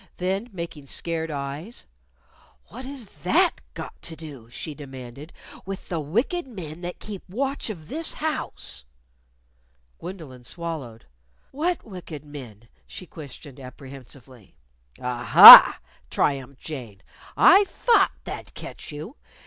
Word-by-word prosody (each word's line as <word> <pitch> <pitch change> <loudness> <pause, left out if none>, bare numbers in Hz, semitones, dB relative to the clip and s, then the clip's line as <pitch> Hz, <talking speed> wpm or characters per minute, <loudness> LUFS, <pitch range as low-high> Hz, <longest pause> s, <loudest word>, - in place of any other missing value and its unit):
Then, 190 +6 -3
making 170 -6 -8
scared 165 +2 -4
eyes, 145 +9 -6 0.8
"What 255 +4 -10
has 270 -3 -8 0.2
that - - +1
got - - -9
to 165 - -8
do," 145 -7 -12
she 150 +5 -7
demanded, 135 +1 -11 0.3
"with 195 0 -8
the 170 - -2
wicked 235 - -2
men 175 - -9
that 175 0 -6
keep 205 -3 -8
watch 270 +6 -3
of 165 -8 -8
this 320 - -5
house?" 310 0 -4 1.2
Gwendolyn 155 -9 -10
swallowed. 150 -8 -7 0.5
"What 335 +5 -2
wicked 175 -7 -10
men?" 120 -7 -12 0.2
she 185 - -9
questioned 145 -3 -12
apprehensively. 130 -3 -13 0.4
"Ah 125 -1 -4
ha!" - - +12 0.3
triumphed 135 -1 -2
Jane. 120 -11 -9 0.3
"I 400 +2 +7
thought 470 +3 +2
that'd - - -9
catch - - -10
you! 155 - -9
155 Hz, 120 wpm, -24 LUFS, 135-195 Hz, 1.2 s, ha